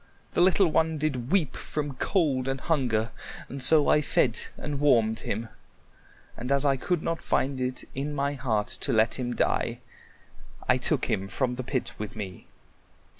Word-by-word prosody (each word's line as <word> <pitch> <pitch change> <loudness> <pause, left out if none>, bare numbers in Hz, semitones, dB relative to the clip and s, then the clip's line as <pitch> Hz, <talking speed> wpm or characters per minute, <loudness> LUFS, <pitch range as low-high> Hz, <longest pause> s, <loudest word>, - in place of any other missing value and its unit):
"The - - +1
little 190 +2 +5
one 160 0 +1
did 135 -5 -2
weep 180 -8 +2
from 145 -2 -4
cold 140 -9 +1
and 135 0 -1
hunger, 120 -9 0 0.4
and 135 0 -6
so 150 +3 +5
I 150 - +5
fed 145 - +1 0.2
and 145 -2 -4
warmed 115 -6 +3
him. 110 +2 -3 0.9
And 125 +3 -5
as 140 +1 +3
I 140 -1 +4
could 165 +5 -1
not 165 0 -2
find 135 -1 0
it 125 0 -2
in 140 +3 -3
my 140 0 0
heart 115 -6 0 0.2
to - - -1
let 110 +3 +2
him 120 -1 -2
die, - - 0 0.9
I - - +4
took - - +1
him 95 +1 -1
from 125 +4 -1
the 130 +1 -4
pit 130 0 -2
with 105 -2 -5
me." 100 -4 -7
135 Hz, 175 wpm, -27 LUFS, 120-150 Hz, 0.9 s, little